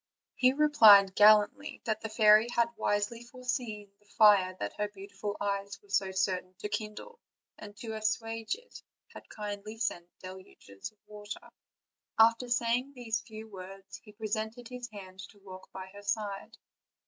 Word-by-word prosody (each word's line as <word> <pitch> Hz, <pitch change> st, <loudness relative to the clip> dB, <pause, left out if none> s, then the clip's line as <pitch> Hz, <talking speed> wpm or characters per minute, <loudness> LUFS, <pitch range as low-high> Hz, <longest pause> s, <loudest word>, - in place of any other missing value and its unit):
He 255 Hz, 0 st, +4 dB
replied 220 Hz, -10 st, +7 dB
gallantly 215 Hz, +8 st, +4 dB
that 220 Hz, -1 st, -1 dB
the 220 Hz, -, -5 dB
fairy 215 Hz, 0 st, +6 dB
had 235 Hz, 0 st, +3 dB
wisely 210 Hz, +2 st, -1 dB
foreseen 240 Hz, -4 st, -5 dB
the 205 Hz, -, -30 dB
fire 200 Hz, -4 st, +5 dB
that -, -, -4 dB
her 210 Hz, -, +1 dB
beautiful 200 Hz, 0 st, -7 dB
eyes 200 Hz, -1 st, -3 dB
were 205 Hz, -, -20 dB
so 195 Hz, -1 st, +1 dB
certain 185 Hz, -1 st, -1 dB
to 210 Hz, -, -5 dB
kindle, 215 Hz, -, -6 dB, 0.4 s
and 205 Hz, -1 st, -11 dB
to 225 Hz, -1 st, -6 dB
assuage 225 Hz, -, -2 dB
it 485 Hz, +2 st, -14 dB, 0.3 s
had -, -, -12 dB
kindly 210 Hz, +1 st, -6 dB
sent 175 Hz, -6 st, -2 dB
deluges 185 Hz, -, -10 dB
of 215 Hz, -, -37 dB
water. 210 Hz, 0 st, -9 dB, 0.7 s
After 230 Hz, +2 st, +4 dB
saying 245 Hz, +3 st, 0 dB
these 230 Hz, -3 st, -2 dB
few 220 Hz, -1 st, -10 dB
words, 195 Hz, -1 st, -10 dB
he 210 Hz, -, -16 dB
presented 220 Hz, +2 st, -4 dB
his 250 Hz, -1 st, -7 dB
hand 190 Hz, -2 st, -11 dB
to 210 Hz, -, -19 dB
walk 185 Hz, -1 st, -12 dB
by 190 Hz, -1 st, -7 dB
her 205 Hz, -, -11 dB
side. 205 Hz, +1 st, -3 dB
210 Hz, 155 wpm, -30 LUFS, 200-225 Hz, 0.7 s, replied